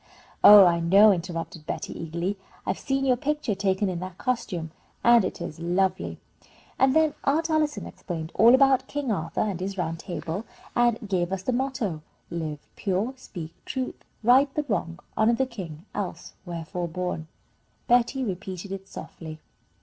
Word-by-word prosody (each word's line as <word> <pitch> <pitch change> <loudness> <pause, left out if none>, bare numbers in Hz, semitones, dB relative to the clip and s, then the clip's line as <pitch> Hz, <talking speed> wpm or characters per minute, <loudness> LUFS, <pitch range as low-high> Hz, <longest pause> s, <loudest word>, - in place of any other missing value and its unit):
"Oh, 205 -2 +11
I 170 -1 +3
know," 195 +6 +6
interrupted 165 -3 -4
Betty, - - -4
eagerly. 170 +4 -3 0.3
"I've 190 - -1
seen 270 -1 -1
your 255 -2 +4
picture 295 -4 -1
taken 195 0 0
in 180 -2 -2
that 185 0 -7
costume, 210 -10 -2 0.3
and 235 -2 +6
it 185 - -3
is 155 - -6
lovely." 180 +2 0 0.6
"And 265 +1 +4
then 315 -1 +4
Aunt 320 +4 +1
Allison 305 -1 +1
explained 165 -3 -6
all 230 +5 +7
about 270 -1 +4
King 285 -4 -2
Arthur 165 -4 -2
and 200 -5 -1
his 195 +2 -4
Round 165 -2 -2
Table, 175 +1 -4 0.3
and 240 -2 +2
gave 180 -2 0
us 190 -1 -3
the 255 - 0
motto: 240 - -2 0.3
'Live 155 -3 -5
pure, 205 +6 -1
speak 170 -10 -8
truth, 260 -1 -4 0.2
right 265 +5 +5
the 300 - +1
wrong, 170 -6 -2 0.2
honour 225 +2 +4
the 265 - +1
king, 180 -9 -8
else 185 -4 -5
wherefore 170 +1 -4
born?'" 170 -1 -4 0.6
Betty 245 +2 +3
repeated 190 -2 -5
it 195 0 -6
softly. 160 -4 -9
195 Hz, 160 wpm, -26 LUFS, 170-245 Hz, 0.6 s, Oh